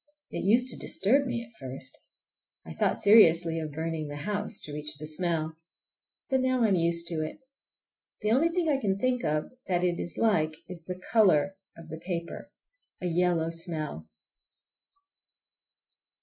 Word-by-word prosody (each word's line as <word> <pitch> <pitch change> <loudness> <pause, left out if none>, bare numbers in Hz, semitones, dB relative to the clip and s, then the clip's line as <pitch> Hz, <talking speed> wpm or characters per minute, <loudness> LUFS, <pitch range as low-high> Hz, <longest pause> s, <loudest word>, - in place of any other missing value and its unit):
It - - -4
used 235 +6 +3
to - - -6
disturb 270 +8 +2
me 235 -1 -3
at 230 0 -23
first. 130 0 -7 0.7
I 80 - -8
thought - - 0
seriously 170 -6 +5
of 155 -1 -5
burning 160 0 -4
the 145 - -7
house—to 200 0 -1
reach 150 0 -1
the 155 - -7
smell. 160 0 -2 0.7
But 265 -2 +1
now 255 -1 +1
I 220 - +4
am 195 - +3
used 170 0 +2
to 165 -2 -2
it. 155 - -6 0.9
The 210 - +1
only 285 +8 +3
thing 340 -1 -1
I 290 -3 +2
can 195 -2 0
think 250 +2 0
of 150 0 -1 0.2
that 180 -1 0
it 175 -1 0
is 170 - -6
like 160 -9 +2
is 175 -2 -10
the 180 0 -6
color 195 -5 +4 0.2
of 165 -1 -12
the 160 0 -7
paper! 170 -2 -5 0.5
A - - -5
yellow 170 -1 +1
smell. 155 - -4
170 Hz, 165 wpm, -28 LUFS, 155-210 Hz, 0.9 s, seriously